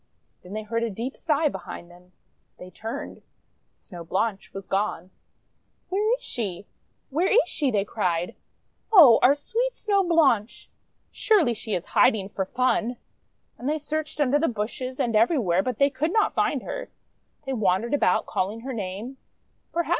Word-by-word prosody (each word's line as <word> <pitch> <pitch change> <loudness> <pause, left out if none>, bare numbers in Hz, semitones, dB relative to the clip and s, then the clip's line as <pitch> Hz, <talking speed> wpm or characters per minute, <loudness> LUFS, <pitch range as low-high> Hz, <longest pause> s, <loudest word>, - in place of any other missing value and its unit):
Then 180 +2 -11
they 215 0 -4
heard 230 +2 -2
a 235 - 0
deep 230 +6 -5
sigh 310 -1 +1
behind 175 -6 -7
them. 180 +1 -19 0.5
They 180 0 -11
turned. 220 +4 -7 0.6
Snow 175 -4 -11
Blanche 195 +4 -2
was 195 0 -8
gone! 190 -2 -2 0.8
'Where 425 +5 +2
Is - - -20
she? 200 -5 -4 0.5
WTiere 345 +6 +2
is 480 +4 +4
she?' 285 -3 -1
they 205 -4 0
cried. 180 -5 -1 0.6
f<0h! 295 - +9
our 270 +3 +6
sweet 480 +11 -2
Snow 400 -2 +1
Blanche! 290 - +1 0.4
Surely 390 - +3
she 220 -1 -4
is 175 - -3
hiding 200 -3 +3
for 195 -1 -3
fun!'! 250 +1 0 0.6
And 255 - -2
they 305 - +1
searched 310 +1 -4
under 290 0 +3
the 325 - +2
bushes 245 +3 -4
and 230 -2 0
every 230 +9 +4
where, 185 -7 +2
but 250 +1 -3
they 280 0 +3
could 295 +5 -1
not 435 +1 +2
find - - 0
her. - - -6 0.6
They 270 - -2
wan 190 -4 +1
dered 235 +4 -4
about, 230 -10 +2
calling 205 +5 -2
her 265 +2 -5
name. 210 +5 -5
235 Hz, 165 wpm, -25 LUFS, 195-295 Hz, 0.8 s, f<0h